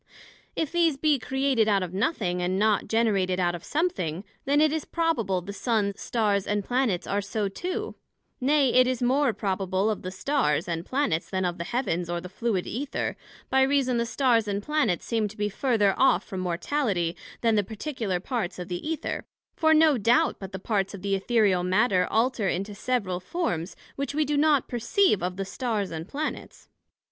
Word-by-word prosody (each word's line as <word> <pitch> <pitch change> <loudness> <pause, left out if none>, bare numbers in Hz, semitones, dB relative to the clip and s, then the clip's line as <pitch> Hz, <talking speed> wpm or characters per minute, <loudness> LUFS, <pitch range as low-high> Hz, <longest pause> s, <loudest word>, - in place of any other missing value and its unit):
If 320 - -1
these 335 -4 +2
be 295 -1 +2
created 265 -1 +1
out 200 -3 +3
of 180 -1 -6
nothing, 190 - 0
and 180 +1 0
not 210 0 +2
generated 200 -5 +1
out 175 -1 +2
of 175 - -7
something, 290 - -1 0.2
then 285 +2 +3
it 305 0 +4
is 315 - -1
probable 235 - 0
the 200 +3 -7
Sun, 210 -2 0
Stars 205 -4 0
and 205 -1 -1
Planets 245 -8 0
are 200 +1 -1
so 205 +1 -2
too; 355 - -4 0.5
nay, 275 0 +3
it 255 0 +6
is 255 -1 -1
more 265 +2 +3
probable 195 0 -1
of 210 - -4
the 185 - -5
Stars, 190 - 0
and 170 0 -3
Planets, 260 - 0
then 185 -1 -1
of 175 0 -2
the 170 - -3
Heavens, 180 -9 -1
or 175 0 -1
the 180 +1 -8
fluid 200 -1 -1
Æther, 280 +4 -3 0.4
by 265 - +4
reason 265 -2 +2
the 235 0 0
Stars 235 -4 +2
and 200 0 -2
Planets 300 - 0
seem 225 -2 0
to 210 - -12
be 210 0 0
further 215 -3 +2
off 270 - +3
from 190 - -6
Mortality, 180 - -1 0.3
then 230 -1 +3
the 210 -1 +3
particular 220 -3 -3
parts 205 -2 -3
of 180 +1 -7
the 175 -1 -3
Æther; 320 0 -3 0.3
for 315 -1 +3
no 310 -4 +5
doubt 235 +4 +3
but 195 -1 -7
the 190 - -5
parts 195 0 -1
of 190 - -11
the 200 -1 0
Æthereal 195 -2 +2
Matter, 185 0 +2
alter 225 -2 +1
into 195 +3 -2
several 200 -4 -1
forms, 185 - -3 0.2
which 280 0 -3
we 305 0 +2
do 295 +1 0
not 290 -2 +3
perceive 240 - +2
of 180 +1 -3
the 195 - -2
Stars 215 -2 -2
and 160 +1 -5
Planets. 300 +6 -5
215 Hz, 195 wpm, -26 LUFS, 185-265 Hz, 0.5 s, it